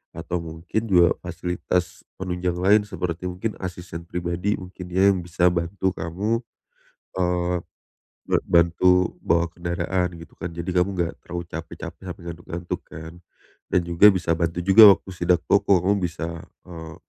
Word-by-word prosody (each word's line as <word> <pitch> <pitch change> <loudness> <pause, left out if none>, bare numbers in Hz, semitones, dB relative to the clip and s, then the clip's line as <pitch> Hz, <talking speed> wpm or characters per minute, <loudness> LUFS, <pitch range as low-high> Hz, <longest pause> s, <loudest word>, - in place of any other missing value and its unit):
atau 85 +2 -3
mungkin 80 +6 -3
juga 90 -2 +5
fasilitas 90 +1 -2 0.2
penunjang 90 -1 -2
lain, 100 +4 +5
seperti 90 -3 -4
mungkin 95 +5 -3
asisten 90 -2 -6
pribadi 90 +3 -1
mungkin 90 0 -9
ya, 95 +2 +4
yang 95 - -3
bisa 85 0 0
bantu 90 +3 -1
kamu, 105 +8 -2 0.8
eee, 90 -1 0 0.7
ban - - +2
bantu 85 +2 +3
bawa 85 0 +2
kendaraan 90 +1 -2
gitu 80 -2 -14
kan. 90 -2 -4
Jadi 85 +2 -5
kamu 90 +1 +2
enggak 85 -1 0
terlalu 85 0 -5
capek-capek 80 +3 -8
sampai 90 - -8
ngantuk-ngantuk 85 +1 -6
kan, 80 +1 -9 0.6
dan 90 - +3
juga 85 +4 +5
bisa 90 -3 -3
bantu 85 0 -1
juga 100 +2 +9
waktu - - -15
sidak 90 -1 +2
toko 100 -2 +4
kamu 100 0 +2
bisa, 80 -1 -4 0.4
eee, 80 -2 -9
90 Hz, 145 wpm, -24 LUFS, 85-95 Hz, 0.8 s, juga